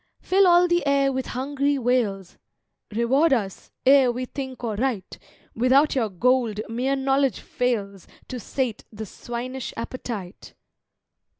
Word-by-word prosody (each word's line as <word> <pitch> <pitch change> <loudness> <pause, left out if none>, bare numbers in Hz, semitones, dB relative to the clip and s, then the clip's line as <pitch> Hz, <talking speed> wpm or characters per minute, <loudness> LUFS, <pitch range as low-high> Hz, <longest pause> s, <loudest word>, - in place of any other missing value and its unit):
Fill 385 +1 +3
all 350 0 +6
the 345 0 +1
air 275 -1 +3
with 260 0 -3
hungry 280 +2 -1
wails 230 -7 -1 0.5
"Reward 255 +9 +2
us, 200 -7 -3 0.2
ere 265 -2 +6
we 250 +1 -4
think 260 -1 -7
or 225 -2 -1
write! 225 -4 -3 0.3
Without 260 +6 +3
your 235 -5 0
Gold 235 +2 +1
mere 250 +4 -1
Knowledge 270 0 +1
fails 205 -6 -2 0.2
To 255 - -5
sate 240 0 -3
the 220 0 -7
swinish 245 +5 -6
appetite!" 230 -5 -7
255 Hz, 130 wpm, -24 LUFS, 225-275 Hz, 0.5 s, all